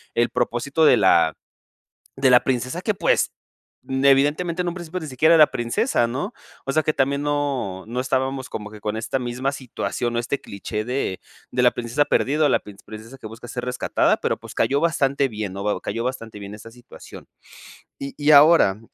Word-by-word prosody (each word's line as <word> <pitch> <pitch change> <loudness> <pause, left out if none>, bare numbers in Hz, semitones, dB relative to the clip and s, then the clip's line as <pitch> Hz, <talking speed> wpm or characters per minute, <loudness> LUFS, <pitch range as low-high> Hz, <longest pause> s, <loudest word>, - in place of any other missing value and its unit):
el 120 0 +2
propósito 125 +6 -1
de - - +6
la 85 -4 +4 0.8
de 135 0 +3
la 125 -1 +6
princesa 130 +6 -2
que 215 - 0
pues, - - +1 0.6
evidentemente, 145 +6 +2
en 175 - -3
un 170 - -3
principio 175 0 -6
ni 160 - -6
siquiera 155 +4 +3
era 155 -2 +8
princesa, 120 - 0
¿no? 145 - -4 0.3
O 135 - -1
sea, 155 - +2
que 155 - 0
también 140 0 0
no 140 -10 -2
no 120 +3 -3
estábamos 130 0 -1
como 105 -1 -6
que 105 - -11
con 105 +1 -3
esta 110 +4 -2
misma 125 +3 -2
situación 120 -2 -4
o - - +1
este 120 +4 -2
cliché 105 +2 -5
de 125 -6 -3 0.3
de 125 - +1
la 125 - +6
princesa 120 +5 -1
perdida 150 +2 +1
o - - +3
la - - +3
princ 100 -1 -14
princesa 110 +5 -11
que 110 - -9
busca 115 +3 -11
ser 125 +1 -5
rescatada, 125 0 +1
pero - - -1
pues, - - -12
cayó 140 +1 +2
bastante 140 -4 +1
bien, 105 -4 -5
¿no?, 100 +2 -2
cayó 115 - -4
bastante 115 -4 -5
bien 100 +1 -8
esta 110 +2 -12
situación. 120 0 -14 0.7
Y 140 0 -6
y 150 +1 +3
ahora 145 - +6
130 Hz, 195 wpm, -22 LUFS, 115-145 Hz, 0.8 s, era